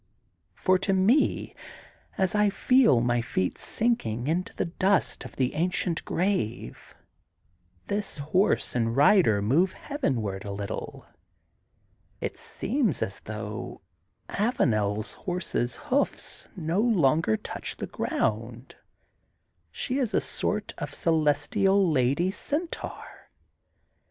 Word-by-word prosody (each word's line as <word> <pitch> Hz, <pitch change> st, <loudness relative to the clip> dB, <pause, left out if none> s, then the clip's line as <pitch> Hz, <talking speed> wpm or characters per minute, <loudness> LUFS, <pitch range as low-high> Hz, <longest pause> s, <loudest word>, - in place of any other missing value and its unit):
For 185 Hz, -1 st, +2 dB
to 195 Hz, +1 st, 0 dB
me, 205 Hz, +10 st, +2 dB, 0.6 s
as 190 Hz, -2 st, +1 dB
I 210 Hz, -1 st, +4 dB
feel 235 Hz, -, +4 dB
my 120 Hz, 0 st, +1 dB
feet 95 Hz, -5 st, -2 dB
sinking 125 Hz, -, -1 dB
into 170 Hz, +5 st, -1 dB
the -, -, -1 dB
dust 190 Hz, +3 st, 0 dB
of -, -, -10 dB
the 130 Hz, -2 st, 0 dB
ancient 170 Hz, 0 st, -1 dB
grave, 175 Hz, -, -2 dB, 0.9 s
this 205 Hz, -3 st, -3 dB
horse 170 Hz, +8 st, +1 dB
and 115 Hz, 0 st, 0 dB
rider 145 Hz, -, +5 dB
move 165 Hz, -, +3 dB
heavenward 115 Hz, -, -2 dB
a 100 Hz, -, -5 dB
little, 100 Hz, 0 st, -5 dB, 1.1 s
it -, -, -3 dB
seems 230 Hz, -, -1 dB
as 95 Hz, -, -5 dB
though 105 Hz, -1 st, -6 dB, 0.5 s
AvanePs 110 Hz, -, 0 dB
horse's 180 Hz, -9 st, -2 dB
hoofs 285 Hz, -1 st, -2 dB
no 170 Hz, +1 st, -1 dB
longer 160 Hz, -, +3 dB
quite -, -, -28 dB
touch -, -, -6 dB
the -, -, -3 dB
ground; 115 Hz, +3 st, -2 dB, 1.0 s
she 255 Hz, -, -2 dB
is 235 Hz, -7 st, 0 dB
a -, -, +5 dB
sort 210 Hz, 0 st, -2 dB
of -, -, -4 dB
celestial 170 Hz, -, +2 dB
lady 140 Hz, +6 st, +2 dB
centaur. 310 Hz, -, -5 dB
165 Hz, 110 wpm, -27 LUFS, -, 1.1 s, rider